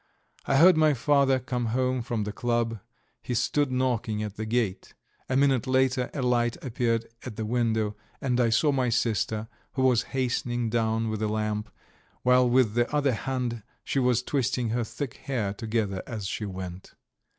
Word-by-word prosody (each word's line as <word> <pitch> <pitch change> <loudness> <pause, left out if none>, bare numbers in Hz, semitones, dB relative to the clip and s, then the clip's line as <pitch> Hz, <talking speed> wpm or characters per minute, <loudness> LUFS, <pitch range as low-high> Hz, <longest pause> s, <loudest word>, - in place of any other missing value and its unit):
I 135 - +3
heard 175 +3 +7
my 155 -2 +4
father 140 +1 +3
come 125 -2 -2
home 130 +2 0
from 115 -2 -2
the 105 - -3
club; 120 0 -1 0.4
he 125 - -3
stood 145 +4 +1
knocking 120 -4 0
at 105 -1 -5
the 110 0 -4
gate. 110 -5 -1 0.3
A 130 - +2
minute 135 -3 +3
later 130 -1 +2
a 140 - -1
light 120 -1 +1
appeared 115 -2 0 0.2
at 120 -4 -7
the 110 - -3
window, 110 -2 0 0.2
and 125 -2 0
I 120 -2 +3
saw 120 +7 +3
my 130 -3 +1
sister, 110 -1 0 0.3
who 130 - 0
was 125 -3 +4 0.2
hastening 120 -2 -1
down 115 -1 +1
with 110 0 -3
a 110 - +1
lamp, 105 0 -2 0.5
while 125 0 +5
with 120 -3 +3
the 120 +1 +1
other 145 -3 +2
hand 125 -1 -2 0.2
she 140 - -1
was 125 -1 +2
twisting 125 -3 0
her 120 +2 0
thick 130 +3 -5
hair 115 -8 -2
together 105 -3 -2
as 110 -4 -5
she 105 +2 -3
went. 95 -1 -7
120 Hz, 175 wpm, -27 LUFS, 110-130 Hz, 0.5 s, heard